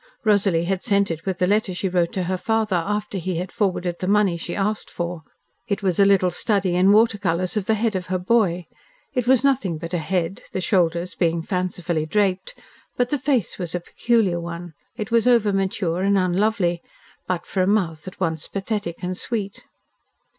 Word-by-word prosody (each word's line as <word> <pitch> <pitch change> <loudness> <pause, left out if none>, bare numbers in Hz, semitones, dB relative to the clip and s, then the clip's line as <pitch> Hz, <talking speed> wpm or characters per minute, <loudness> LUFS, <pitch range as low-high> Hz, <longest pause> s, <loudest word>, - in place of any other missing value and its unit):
Rosalie 200 -6 +3
had 185 +1 -1
sent 200 -4 +2
it 165 +3 -6
with 190 -2 -1
the 180 - +2
letter 205 -1 +1
she 190 - -1
wrote 175 -2 +1
to 185 - -1
her 185 +2 -1
father 220 -1 0
after 205 +3 -2
he 180 +1 -3
had 180 +2 -4
forwarded 180 -4 -1
the 185 - -3
money 200 -3 +3
she 170 +1 -5
asked 210 +2 -1
for. 175 -1 -4 0.5
It 200 -1 -2
was 185 -2 0
a 200 - +7
little 190 -2 +4
study 195 0 0
in 185 +2 +4
water 220 0 +4
colours 180 0 0
of 210 -3 -1
the 220 - +3
head 220 -1 0
of 180 -1 -3
her 185 0 0
boy. 180 -3 +1 0.5
It 250 -3 -1
was 260 0 +4
nothing 250 - +1
but 165 +2 -7
a 175 - +1
head, 175 +2 -2
the - - -1
shoulders 175 -1 +1
being 170 -2 0
fancifully 180 -4 -2
draped, 195 0 0 0.4
but 245 0 +1
the 290 - +1
face 260 - 0
was 175 -1 -4
a - - 0
peculiar 200 0 +1
one. 170 0 -7 0.2
It 215 -2 -5
was 230 +1 +3
over 230 -5 +4
mature, 190 -2 -1
and 200 +1 +3
unlovely, 185 -1 +1 0.5
but 180 -2 -2
for 190 - -1
a 185 - +2
mouth 180 -6 0
at 185 - -9
once 160 -4 -2
pathetic 195 -3 -4
and 180 +1 -2
sweet. 205 -1 -4
185 Hz, 200 wpm, -23 LUFS, 175-210 Hz, 0.5 s, a